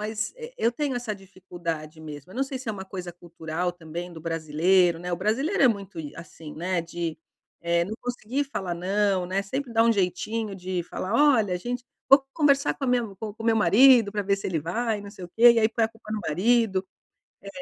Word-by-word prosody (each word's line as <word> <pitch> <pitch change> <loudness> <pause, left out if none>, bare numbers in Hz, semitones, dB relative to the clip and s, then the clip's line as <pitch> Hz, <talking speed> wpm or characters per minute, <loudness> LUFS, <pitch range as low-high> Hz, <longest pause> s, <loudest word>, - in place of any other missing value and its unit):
mas 210 0 -3
e 480 +1 -9
eu 235 - +2
tenho 280 +2 -2
essa 245 -3 -3
dificuldade 175 -5 -7
mesmo 150 +1 -9
eu 235 - -11
não 270 - +1
sei 270 -1 -6
se 250 -3 -7
é - - 0
uma 190 -2 -7
coisa 180 -2 -7
cultural 170 0 -4
também 175 +1 -7
do 160 - -10
brasileiro, 165 +2 +2
né. 180 0 -5
O - - +1
brasileiro 270 - 0
é - - +8
muito 200 -5 -3
i 150 -3 -6
assim, 165 -2 -10
né, 175 +2 -1
de 170 -1 -5 0.4
eh, 170 0 +1
não 210 - -5
conseguir 245 +3 -2
falar 190 -10 -4
não, 190 +1 0
né. 195 +2 -1
Sempre 255 +4 -4
dar 225 - +4
um 230 - +5
jeitinho 210 +2 -1
de 185 -1 -3
falar 190 +5 -4 0.2
olha 205 -6 +1
a - - 0
gente 245 +6 -4 0.2
vou 275 0 +7
conversar 280 -3 +3
com 275 - -5
a - - -1
minha 245 -1 +2
co 210 0 -6
com 225 - -10
o - - -3
meu 225 -1 +4
marido 230 0 +6
pra 205 -1 -1
ver 200 0 +1
se 195 - -5
ele 165 -5 -1
vai 220 +7 -1
e - - -8
não 200 - -9
sei 185 - -10
o - - -9
que 240 +1 +9
e 230 - +2
aí 220 0 +4
põe 230 0 +1
a - - 0
culpa 225 -1 -15
no 215 - -2
marido. 195 +2 +2 0.6
É. 200 - -9
195 Hz, 240 wpm, -26 LUFS, 175-230 Hz, 0.6 s, que